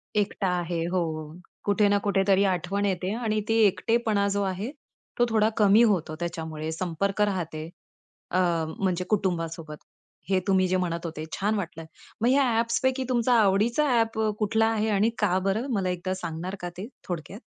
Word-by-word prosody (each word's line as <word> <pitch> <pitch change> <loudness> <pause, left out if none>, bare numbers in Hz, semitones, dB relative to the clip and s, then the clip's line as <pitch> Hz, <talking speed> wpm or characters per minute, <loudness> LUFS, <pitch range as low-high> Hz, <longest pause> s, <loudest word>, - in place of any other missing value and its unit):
एकटा 205 -1 0
आहे, 170 -1 -2
हो. 160 -4 -2 0.3
कुठे 205 0 +3
ना 205 - +4
कुठे 195 -1 +2
तरी 195 0 +4
आठवण 195 +1 0
येते 185 -1 -1
आणि 220 -3 -1
ते 225 - +3
एकटेपणा 220 0 +1
जो 200 0 0
आहे, 195 +5 -3 0.5
तो 240 - +5
थोडा 220 -1 +3
कमी 210 +1 +6
होतो 160 -5 -2
त्याच्यामुळे. 160 -2 -4
संपर्क 185 +4 -2
राहतो 160 -3 -4 0.6
अ, 185 - +2 0.4
म्हणजे 185 -2 0
कुटुंबासोबत. 165 -6 -2 0.5
हे 190 -1 +3
तुम्ही 190 -1 +3
जे 185 - +1
म्हणत 170 -2 -2
होते 155 -1 -5
छान 210 +3 0
वाटलं. 165 -5 -4 0.4
मग 235 - +3
ह्या 275 +2 +4 0.2
ॲप्सपैकी 260 +3 0
तुमचा 245 0 +2
आवडीचा 215 +8 +2
ॲप 225 -1 0 0.2
कुठला 220 +1 +2
आहे? 220 -1 +1
आणि 210 +2 +3
का 190 -3 +2
बरं? 220 +7 0
मला 190 -3 0
एकदा 180 +1 -2
सांगणार 175 +1 -5
का 175 - -3
ते, 200 +5 -5 0.2
थोडक्यात? 175 +3 -5
195 Hz, 165 wpm, -26 LUFS, 175-215 Hz, 0.6 s, कमी